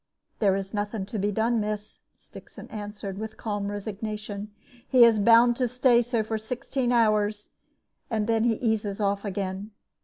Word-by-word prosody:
"There 195 Hz, -3 st, +3 dB
is 195 Hz, +1 st, -4 dB
nothing 205 Hz, -1 st, -2 dB
to 210 Hz, +2 st, -5 dB
be 205 Hz, +2 st, 0 dB
done, 225 Hz, +3 st, +1 dB
miss," 210 Hz, 0 st, -4 dB, 0.2 s
Stixon -, -, -13 dB
answered, 205 Hz, -2 st, -6 dB
with 220 Hz, 0 st, -6 dB
calm 205 Hz, -2 st, -3 dB
resignation; 210 Hz, 0 st, -5 dB, 0.4 s
"he 255 Hz, -2 st, +6 dB
is 230 Hz, -2 st, +6 dB
bound 235 Hz, +3 st, +6 dB
to 250 Hz, -, +1 dB
stay 250 Hz, 0 st, +4 dB
so 235 Hz, -2 st, -1 dB
for 220 Hz, 0 st, -3 dB
sixteen 245 Hz, +3 st, -2 dB
hours, 215 Hz, -3 st, +1 dB, 0.6 s
and 220 Hz, -3 st, 0 dB
then 225 Hz, 0 st, +1 dB
he 235 Hz, -1 st, +2 dB
eases 215 Hz, -3 st, -1 dB
off 200 Hz, -1 st, 0 dB
again. 195 Hz, 0 st, -4 dB
215 Hz, 160 wpm, -26 LUFS, 205-230 Hz, 0.6 s, he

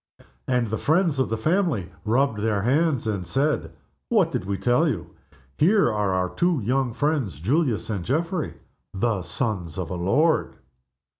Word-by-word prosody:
And 125 Hz, -2 st, +2 dB
the 110 Hz, -, -2 dB
friends 160 Hz, -2 st, +2 dB
of 130 Hz, -, +1 dB
the 115 Hz, -, -1 dB
family 155 Hz, -, 0 dB
rubbed 120 Hz, 0 st, +1 dB
their 105 Hz, -2 st, 0 dB
hands 140 Hz, +1 st, +2 dB
and 100 Hz, -4 st, -1 dB
said, 135 Hz, -, 0 dB, 0.4 s
"What -, -, +3 dB
did -, -, -2 dB
we 100 Hz, 0 st, -2 dB
tell 125 Hz, -, +2 dB
you? 90 Hz, -, -4 dB, 0.5 s
Here 190 Hz, -, +4 dB
are 105 Hz, -2 st, 0 dB
our 90 Hz, -1 st, -1 dB
two 175 Hz, -3 st, +1 dB
young 130 Hz, +3 st, +1 dB
friends, 125 Hz, -, -1 dB
Julius 125 Hz, -, 0 dB
and 100 Hz, -5 st, -3 dB
Geoffrey, 160 Hz, -, -1 dB, 0.4 s
the 105 Hz, 0 st, 0 dB
sons 90 Hz, -, -3 dB
of 90 Hz, -2 st, -4 dB
a -, -, -2 dB
lord!" 145 Hz, -, +1 dB
120 Hz, 160 wpm, -24 LUFS, 100-155 Hz, 0.5 s, Here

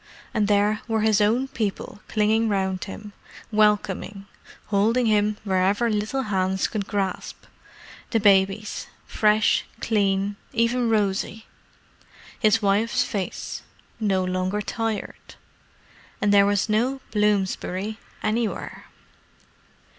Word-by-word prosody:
And 210 Hz, -1 st, +1 dB
there 205 Hz, +1 st, +2 dB
were 225 Hz, -1 st, 0 dB
his 215 Hz, -1 st, +3 dB
own 235 Hz, +6 st, +2 dB
people 220 Hz, -5 st, -4 dB
clinging 220 Hz, +1 st, +2 dB
round 190 Hz, -2 st, -1 dB
him, 205 Hz, +1 st, -9 dB, 0.4 s
welcoming, 210 Hz, -2 st, +1 dB, 0.4 s
holding 220 Hz, +5 st, +2 dB
him 210 Hz, -1 st, +2 dB
wherever 200 Hz, +4 st, +1 dB
little 215 Hz, +6 st, -1 dB
hands 190 Hz, -3 st, 0 dB
could 205 Hz, -3 st, -4 dB
grasp: 195 Hz, -2 st, -3 dB, 0.7 s
the 225 Hz, -, +1 dB
babies 200 Hz, 0 st, +2 dB, 0.2 s
fresh, 215 Hz, 0 st, +2 dB, 0.2 s
clean, 200 Hz, -2 st, 0 dB, 0.2 s
even 235 Hz, 0 st, +1 dB
rosy; 210 Hz, 0 st, 0 dB, 0.9 s
his 220 Hz, -1 st, +3 dB
wife's 205 Hz, +4 st, +2 dB
face, 195 Hz, -3 st, -4 dB, 0.4 s
no 195 Hz, -4 st, +1 dB
longer 185 Hz, +2 st, -1 dB
tired. 225 Hz, +1 st, -4 dB, 0.8 s
And 205 Hz, 0 st, +2 dB
there 200 Hz, 0 st, +6 dB
was 205 Hz, 0 st, +1 dB
no 245 Hz, +5 st, 0 dB
Bloomsbury 210 Hz, 0 st, 0 dB, 0.2 s
anywhere. 225 Hz, +1 st, -2 dB
210 Hz, 105 wpm, -24 LUFS, 195-220 Hz, 0.9 s, there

